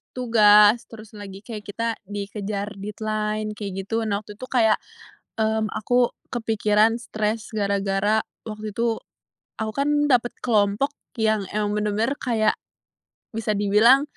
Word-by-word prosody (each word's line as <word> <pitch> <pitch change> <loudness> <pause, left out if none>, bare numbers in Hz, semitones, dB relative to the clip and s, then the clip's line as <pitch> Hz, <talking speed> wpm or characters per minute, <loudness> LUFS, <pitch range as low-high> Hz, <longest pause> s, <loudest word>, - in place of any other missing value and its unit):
tugas, 215 -2 +6
terus 220 -1 -12
lagi 195 -2 -8
kayak 215 -2 -7
kita 230 +3 -2 0.2
dikejar 205 0 -4
deadline 215 +1 -2
kayak 195 -2 -5
gitu, 225 +2 -1
nah 200 -1 0
waktu 210 - -11
itu 255 - -7
kayak, 225 -4 +4 0.6
mmm, 220 0 +1
aku 245 +2 +2 0.2
kepikiran, 220 -1 +2
stress 215 0 -2
gara-gara 200 +1 +1 0.2
waktu 215 -1 -6
itu, 230 0 0 0.6
aku 220 0 -2
kan 280 +5 0 0.2
dapet 240 -2 +3
kelompok 215 +4 +2 0.3
yang 215 -2 +2
emang 210 0 0
benar-benar 210 +6 0
kayak, 225 -4 +1 0.8
bisa 220 -1 -1
dibilang, 210 +7 +5
215 Hz, 125 wpm, -24 LUFS, 205-225 Hz, 0.8 s, tugas